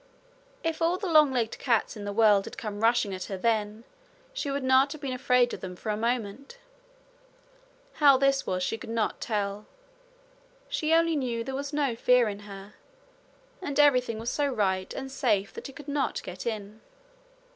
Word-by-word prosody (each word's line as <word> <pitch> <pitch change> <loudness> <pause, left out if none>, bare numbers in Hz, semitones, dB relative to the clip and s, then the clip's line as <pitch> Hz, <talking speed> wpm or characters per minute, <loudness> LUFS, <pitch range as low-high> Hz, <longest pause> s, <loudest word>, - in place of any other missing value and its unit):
If 325 0 -2
all 335 +2 +2
the 395 - -5
long 305 -5 +5
legged 235 -4 -1
cats 230 -5 +1
in 205 -2 -7
the 205 - -3
world 210 -2 +4
had - - -9
come 210 -2 -5
rushing 225 -3 +2
at 185 -1 -5
her 195 - -5
then 215 +1 -1 0.5
she - - -3
would 280 0 -2
not 260 +2 +4
have 310 - -11
been 270 -3 -3
afraid 250 -1 +2
of - - -6
them 180 -1 -6
for 215 - -4
a - - -1
moment. 235 - -3 1.4
How 280 -2 +7
this 275 0 +1
was 185 0 -1
she 225 - -2
could - - -9
not 225 -1 -1
tell 205 -1 -3 1.0
she 310 0 -1
only 330 0 +4
knew 240 -5 -2
there 265 +3 -6
was 280 +1 -4
no 285 -5 0
fear 250 0 +4
in 200 -1 -6
her, 195 +1 -10 0.9
and 290 -5 -3
everything 250 -6 +4
was 230 +2 -3
so 290 -1 0
right 190 -7 -1
and 270 0 -6
safe 215 -8 0
that - - -8
it 275 - -13
could 290 0 -11
not 285 -1 -1
get 180 +5 -7
in. 215 -1 -5
240 Hz, 190 wpm, -27 LUFS, 210-275 Hz, 1.4 s, How